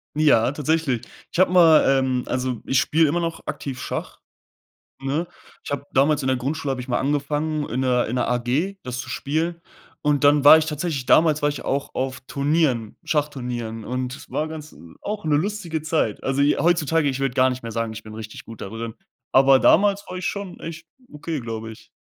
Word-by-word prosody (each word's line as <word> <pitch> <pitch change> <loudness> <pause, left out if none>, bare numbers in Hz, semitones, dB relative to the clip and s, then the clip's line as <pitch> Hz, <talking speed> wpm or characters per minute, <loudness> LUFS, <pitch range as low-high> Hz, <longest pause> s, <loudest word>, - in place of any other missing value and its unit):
Ja, 135 -6 +4
tatsächlich. 145 -4 -1 0.2
Ich - - -3
habe 185 - +5
mal, 165 -4 +6
ähm 130 -1 0
also, 125 -2 -2
ich 135 -1 +2
spiele 160 0 +3
immer 170 +4 0
noch 165 -1 -4
aktiv 130 -3 -5
Schach, - - -5 0.8
ne? 145 +6 -2 0.4
Ich - - -7
habe 140 0 -3
damals 140 +2 +3
in 130 - -1
der 130 - +2
Grundschule 140 +3 -3
habe 130 - -4
ich 125 - -8
mal 120 - +1
angefangen, 145 +2 -1
in 125 - -2
'ner 125 -1 +2
in 120 - -2
'ner - - +1
AG 125 +11 0
das 125 0 -5
zu - - -8
spielen. 165 +4 -2 0.4
Und 145 -1 +1
dann 145 0 +5
war 150 +2 +10
ich 160 - -1
tatsächlich 150 -3 -3
damals 155 0 +4
war 145 - +3
ich 145 - -7
auch 140 0 -2
auf 130 0 -3
Turnieren, 140 -6 0
Schachturnieren. 125 -7 -2
Und 125 +1 -3
es - - -14
war 155 - -2
ganz 155 -1 -9 0.3
auch 210 -2 -4
'ne 150 -2 +2
lustige 175 -3 -2
Zeit. 155 -9 -1
Also, 135 +1 +1
j 145 - +3
heutzutage 165 -2 +2
ich 135 0 -2
würde 135 -2 -1
gar 130 0 +4
nicht 125 0 -5
mehr 115 - -6
sagen, 115 0 -2
ich 110 +1 -8
bin 110 0 -11
richtig 110 0 -8
gut 115 -2 -11
da - - -5
drin. 115 0 -6 0.4
Aber 135 0 +6
damals 200 +2 +4
war 185 - -6
ich 180 - -4
schon 200 -3 -4
echt 165 0 -8 0.3
okay, 150 +1 -4
glaube 115 -2 -5
ich. 110 - -13
145 Hz, 205 wpm, -23 LUFS, 125-160 Hz, 0.8 s, war